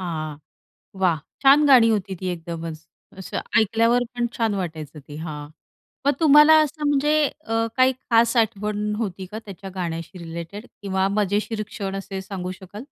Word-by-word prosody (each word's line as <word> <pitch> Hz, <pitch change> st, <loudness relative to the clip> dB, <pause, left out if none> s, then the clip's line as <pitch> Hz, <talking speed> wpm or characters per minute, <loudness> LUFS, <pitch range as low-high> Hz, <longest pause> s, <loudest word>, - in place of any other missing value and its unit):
हां. 155 Hz, -4 st, -4 dB, 0.7 s
वाह! 170 Hz, -4 st, +3 dB, 0.2 s
छान 280 Hz, +2 st, +7 dB
गाणी 245 Hz, -5 st, +7 dB
होती 195 Hz, -3 st, -1 dB
ती 185 Hz, -, -4 dB
एकदमच. 165 Hz, -1 st, -7 dB, 0.3 s
असं 190 Hz, -, -5 dB, 0.2 s
ऐकल्यावर 230 Hz, +3 st, +2 dB
पण 240 Hz, -1 st, 0 dB
छान 225 Hz, -3 st, +1 dB
वाटायचं 160 Hz, -5 st, -5 dB
ते 145 Hz, -, -8 dB
हां. 150 Hz, -2 st, -6 dB, 0.6 s
मग 285 Hz, -, +5 dB
तुम्हाला 300 Hz, 0 st, +7 dB
असं 300 Hz, 0 st, -2 dB
म्हणजे 290 Hz, +1 st, +2 dB, 0.3 s
अ, 225 Hz, 0 st, 0 dB
काही 260 Hz, 0 st, +5 dB
खास 235 Hz, -1 st, +2 dB
आठवण 210 Hz, -2 st, 0 dB
होती 190 Hz, -4 st, -4 dB
का 215 Hz, +4 st, -7 dB
त्याच्या 195 Hz, -1 st, -9 dB
गाण्याशी 170 Hz, 0 st, -5 dB
रिलेटेड? 170 Hz, +6 st, -7 dB, 0.2 s
किंवा 190 Hz, -1 st, 0 dB
मजेशीर 210 Hz, +2 st, 0 dB
क्षण 195 Hz, -3 st, -5 dB
असे 195 Hz, 0 st, -5 dB
सांगू 190 Hz, -2 st, -5 dB
शकाल? 190 Hz, +2 st, -13 dB
200 Hz, 155 wpm, -23 LUFS, 175-230 Hz, 0.7 s, छान